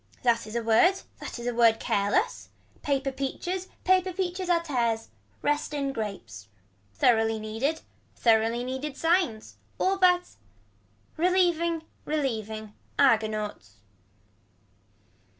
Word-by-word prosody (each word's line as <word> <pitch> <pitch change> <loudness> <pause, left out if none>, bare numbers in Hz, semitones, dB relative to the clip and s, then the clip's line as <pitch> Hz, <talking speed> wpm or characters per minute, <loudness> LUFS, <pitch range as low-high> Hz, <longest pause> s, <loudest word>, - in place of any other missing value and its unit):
That 230 -3 +2
is 215 - -8
a 235 - -1
word. 350 +13 +4 0.2
That - - -7
is 235 - -7
a 245 - -1
word 230 -1 +4
careless. 205 - 0 0.3
Paper 275 -1 0
peaches. 350 +8 -3 0.2
Paper 370 0 +3
peaches 365 0 -3
are 340 -1 +3
tears. 235 -7 -1 0.3
Rest 295 0 0
in 275 -1 -1
grapes. 120 - -6 0.4
Thoroughly 225 - +3
needed. 225 +9 -2 0.3
Thoroughly 230 +1 +2
needed 265 +3 -4
signs. 330 -10 0 0.2
All 385 +1 +1
but. 360 -1 +3 0.8
Relieving 340 -2 +2 0.2
relieving. 220 -8 -3 0.2
Argonauts. 215 - +1
260 Hz, 110 wpm, -27 LUFS, 220-340 Hz, 0.8 s, word